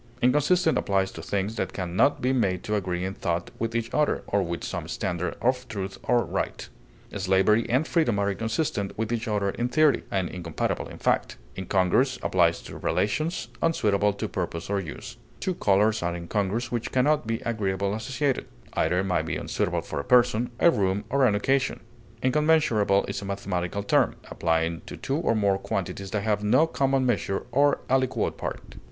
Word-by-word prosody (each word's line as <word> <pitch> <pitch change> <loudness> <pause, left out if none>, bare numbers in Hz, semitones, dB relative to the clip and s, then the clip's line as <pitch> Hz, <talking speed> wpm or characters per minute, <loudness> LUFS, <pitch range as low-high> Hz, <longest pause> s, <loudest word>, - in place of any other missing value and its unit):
Inconsistent 150 +7 +3
applies 95 -1 0
to - - -8
things 100 +3 -2
that - - -2
can 90 -2 -4
not 140 +7 +3
be 130 +1 +2
made 95 -8 0
to 105 - -3
agree 90 -3 -2
in 95 - -3
thought 85 -2 -2
with 115 0 -2
each 115 0 -2
other, 150 -1 +1
or 100 - +1
with 85 -2 -3
some - - -4
standard 90 -1 -2
of 125 +1 +1
truth 100 -4 -5
or 120 -1 +2
right; - - -3 0.5
slavery 95 +3 +2
and 130 +6 +2
freedom 155 - +2
are 100 0 +1
inconsistent 110 -1 -2
with 110 +1 -1
each 115 0 -2
other 100 -2 0
in 120 +4 -2
theory, 155 +1 +3
and 95 -2 0
incompatible 85 -3 -3
in - - -10
fact. - - 0 0.2
Incongruous 95 +8 +1
applies 85 -2 +2
to - - -9
relations, 155 - -1
unsuitable 105 -11 +2
to 110 +2 -4
purpose 85 -1 -4
or 100 - +1
use; 85 -5 -7 0.2
two 185 - -1
colors 105 - +2
are 85 0 -1
incongruous 105 +7 -2
which 120 -2 -2
can 130 0 +2
not 150 -5 +2
be 115 0 -1
agreeably 100 -5 -1
associated; 130 +5 -1 0.3
either 90 +2 +1
may 95 -2 +1
be - - -3
unsuitable - - -1
for - - -5
a - - -3
person, 120 - +3
a 170 - +6
room, 100 -4 0
or 135 -1 +4
an 105 - +2
occasion. 135 +6 +1 0.4
Incommensurable 130 -8 +3
is - - -4
a - - -6
mathematical 100 -1 -3
term, - - +2 0.2
applying 80 0 0
to - - -7
two 135 - -2
or 155 -8 +1
more 100 -2 +2
quantities 100 0 -3
that 100 0 -2
have 105 -2 0
no 125 +9 +4
common 135 -4 +1
measure 105 -5 0
or 140 +3 +3
aliquot 130 -1 +1
part. - - -6
105 Hz, 185 wpm, -26 LUFS, 95-125 Hz, 0.5 s, a